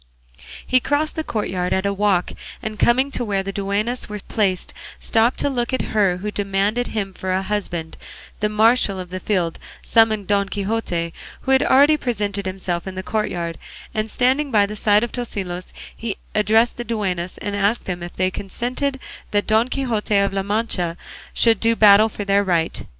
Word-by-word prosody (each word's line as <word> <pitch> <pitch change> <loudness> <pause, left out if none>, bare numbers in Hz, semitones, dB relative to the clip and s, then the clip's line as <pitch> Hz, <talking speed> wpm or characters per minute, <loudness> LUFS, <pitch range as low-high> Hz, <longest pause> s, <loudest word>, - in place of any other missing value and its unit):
He 255 - +3
crossed 290 +4 0
the 315 - -3
courtyard 185 -8 -2
at 190 +1 0
a 200 - +1
walk, 200 -3 +1 0.3
and 215 -1 -5
coming 260 +4 +3
to 250 - -1
where 200 -4 -1
the 195 - -4
duennas 205 +5 -2
were 210 - -4
placed 195 -4 0 0.3
stopped 230 +2 +2
to - - +1
look 245 -3 -1
at 260 - +1
her 195 -4 +3
who 210 +3 -4
demanded 205 +4 0
him 200 -3 -3
for 185 0 -4
a 190 +1 0
husband; 180 -5 -3 0.4
the 210 - +1
marshal 215 -2 +3
of 180 -1 -7
the 185 - -4
field 180 -5 -1 0.2
summoned 220 -3 +3
Don 200 -1 +1
Quixote, 195 -5 -2 0.3
who 265 - -1
had 265 - +5
already 290 +3 +5
presented 205 -7 -2
himself 185 -2 -3
in 190 - -6
the 185 - -4
courtyard, 175 -6 -2 0.3
and 215 0 -1
standing 265 +6 +2
by 210 -5 +4
the 210 +1 -6
side 210 0 +3
of 240 - -3
Tosilos 190 -7 -5 0.2
he 225 -3 -4 0.2
addressed 220 +3 +3
the 240 - -3
duennas, 190 -6 -2
and 205 -1 -4
asked 205 +4 +1
them 180 -2 -4
if 175 0 -7
they 185 0 0
consented 250 +8 -3 0.3
that 205 0 +1
Don 220 +2 +3
Quixote 230 -6 0
of 200 0 +2
La 195 - 0
Mancha 195 -4 -1 0.3
should 225 -3 +3
do 230 0 +2
battle 215 0 +7
for 205 -1 -6
their 200 0 +3
right. 170 -4 0
205 Hz, 185 wpm, -21 LUFS, 190-230 Hz, 0.4 s, battle